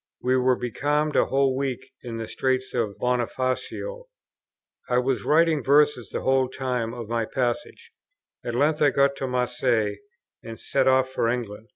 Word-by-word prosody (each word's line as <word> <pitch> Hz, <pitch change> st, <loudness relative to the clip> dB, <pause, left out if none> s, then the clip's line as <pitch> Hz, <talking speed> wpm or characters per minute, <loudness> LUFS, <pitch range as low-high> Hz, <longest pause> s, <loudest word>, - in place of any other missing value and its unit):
We 130 Hz, +1 st, +2 dB
were 130 Hz, 0 st, +3 dB
becalmed 145 Hz, +5 st, -1 dB
a -, -, +4 dB
whole 135 Hz, -1 st, +2 dB
week 130 Hz, -1 st, -3 dB
in 120 Hz, -2 st, -6 dB
the 115 Hz, -1 st, -5 dB
Straits 130 Hz, 0 st, -1 dB
of 110 Hz, -5 st, -1 dB
Bonifacio. 130 Hz, -, -2 dB, 0.8 s
I 125 Hz, -, +2 dB
was 125 Hz, -4 st, 0 dB
writing 160 Hz, -1 st, +3 dB
verses 145 Hz, -2 st, +3 dB
the -, -, -4 dB
whole 130 Hz, -1 st, +2 dB
time 125 Hz, -4 st, -2 dB
of 120 Hz, -3 st, -7 dB
my 115 Hz, 0 st, -1 dB
passage. 130 Hz, -, -3 dB, 0.5 s
At 120 Hz, -, -4 dB
length 150 Hz, +4 st, +2 dB
I 145 Hz, -, +6 dB
got 140 Hz, +1 st, +2 dB
to 135 Hz, -, -3 dB
Marseilles, 125 Hz, -4 st, 0 dB, 0.4 s
and 115 Hz, 0 st, -9 dB
set 135 Hz, -1 st, 0 dB
off 130 Hz, 0 st, +3 dB
for 115 Hz, -3 st, 0 dB
England. 115 Hz, -3 st, -4 dB
130 Hz, 165 wpm, -25 LUFS, 120-140 Hz, 0.8 s, I